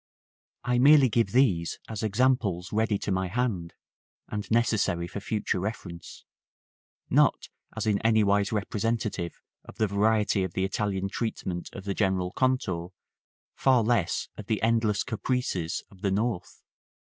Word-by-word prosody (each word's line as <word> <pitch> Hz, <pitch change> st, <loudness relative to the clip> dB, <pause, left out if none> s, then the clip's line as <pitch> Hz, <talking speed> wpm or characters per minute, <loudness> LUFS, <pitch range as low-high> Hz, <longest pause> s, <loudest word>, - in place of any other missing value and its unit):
§ -, -, -, 0.6 s
XVIII. 125 Hz, 0 st, +1 dB
I -, -, +2 dB
merely 140 Hz, 0 st, +7 dB
give 115 Hz, -3 st, +1 dB
these 100 Hz, -11 st, +2 dB
as 110 Hz, -3 st, -5 dB
examples 105 Hz, -5 st, +1 dB
ready 110 Hz, -1 st, +1 dB
to 100 Hz, -, -4 dB
my 95 Hz, 0 st, 0 dB
hand, 95 Hz, -5 st, -2 dB, 0.5 s
and 105 Hz, -1 st, -5 dB
necessary 110 Hz, -7 st, +1 dB
for 100 Hz, -, -6 dB
future 105 Hz, -2 st, -2 dB
reference; 90 Hz, -4 st, -6 dB, 0.9 s
not -, -, +3 dB, 0.3 s
as -, -, -1 dB
in 105 Hz, -2 st, +2 dB
anywise 105 Hz, -3 st, +3 dB
representative 110 Hz, -3 st, -2 dB, 0.2 s
of -, -, -13 dB
the 110 Hz, 0 st, +1 dB
variety 105 Hz, 0 st, +2 dB
of 95 Hz, -3 st, -4 dB
the 95 Hz, -, -1 dB
Italian 95 Hz, -1 st, -1 dB
treatment 95 Hz, -5 st, -4 dB
of 100 Hz, -, -8 dB
the 100 Hz, -, -1 dB
general 95 Hz, -3 st, 0 dB
contour, 95 Hz, -9 st, -1 dB, 0.6 s
far 130 Hz, -3 st, +3 dB
less 110 Hz, -5 st, +1 dB
of 105 Hz, -, -8 dB
the 110 Hz, -, 0 dB
endless 110 Hz, -3 st, +2 dB
caprices 115 Hz, -7 st, -2 dB
of 95 Hz, -2 st, -18 dB
the 100 Hz, -, +1 dB
North. 100 Hz, -2 st, -2 dB
105 Hz, 150 wpm, -27 LUFS, 95-115 Hz, 0.9 s, merely